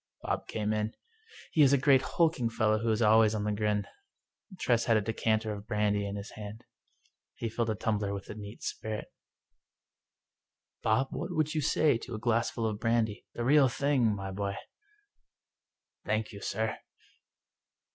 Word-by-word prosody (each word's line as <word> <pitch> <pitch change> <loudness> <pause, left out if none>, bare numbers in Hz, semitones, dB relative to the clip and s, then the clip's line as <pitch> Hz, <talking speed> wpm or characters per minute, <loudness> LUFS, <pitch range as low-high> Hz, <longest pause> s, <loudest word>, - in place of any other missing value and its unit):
Bob - - -2
came 105 0 -1
in. 110 +1 -2 0.6
He 155 - +3
is 140 -1 +6
a - - +6
great 135 -1 +5
hulking 160 -9 +1
fellow 110 -2 +2
who 115 +1 -1
is 110 +1 +2
always 110 0 +5
on 105 - -1
the 105 - 0
grin. 105 -1 0 0.7
Tress 120 -8 +2
had 115 -2 +4
a - - +2
decanter 110 0 0
of 105 +1 -9
brandy 105 -1 +1
in 100 - -4
his 100 0 -7
hand. 105 +2 -8 0.7
He 115 - -3
filled 115 +1 -1
a 110 - 0
tumbler 105 -1 -1
with 100 -1 -5
the - - -7
neat 105 0 -9
spirit 110 -1 -5 0.9
" - - -61
Bob, 125 +5 +2
what - - -4
would 155 -3 0
you 155 - 0
say 145 -3 +3
to 120 -1 -7
a - - -5
glassful 115 0 0
of 105 -2 -2
brandy 115 -2 0
— - - -50
^the 120 - -2
real 140 0 +6
thing 140 0 +1
— - - -6
^my 95 -1 -5
boy? 100 0 -2 0.8
" - - -61
"Thank 110 0 0
you, 100 - -10
sir." 110 0 -2
110 Hz, 180 wpm, -30 LUFS, 105-120 Hz, 0.9 s, is